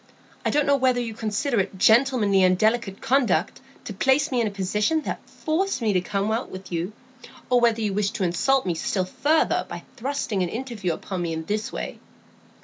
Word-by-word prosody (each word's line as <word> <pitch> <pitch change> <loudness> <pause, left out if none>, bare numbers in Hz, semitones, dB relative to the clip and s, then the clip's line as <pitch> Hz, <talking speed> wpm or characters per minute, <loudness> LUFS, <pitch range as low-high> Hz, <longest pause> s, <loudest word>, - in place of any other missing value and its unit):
I - - +1
don't 295 -1 +2
know 280 0 +4
whether 255 -2 +2
you 230 -2 -3
consider 220 +3 -1
it 190 0 -2
gentlemanly 220 -2 +4
and 185 0 +4
delicate 215 -1 0
conduct 240 - +1 0.2
to 210 - -5
place 270 +8 +2
me 250 -2 +2
in 225 - +1
a - - -1
position 210 +10 0
that - - -3
forced 340 +1 -1
me 220 -4 +1
to 180 - +2
come 200 +3 -1
out 230 +3 -2
with 185 0 -9
you, 175 +4 -2 0.6
or 250 - +5
whether 230 -1 +3
you 210 -2 0
wished 200 0 -1
to - - -1
insult 225 +10 +2
me 180 - 0
still 185 +3 -1
further 300 +11 +1
by - - -7
thrusting 245 -5 -2
an 180 - 0
interview 230 -6 -3
upon 185 +3 -5
me 170 -1 -2
in 160 0 -4
this 210 +3 -2
way." - - -5
215 Hz, 205 wpm, -24 LUFS, 190-260 Hz, 0.6 s, or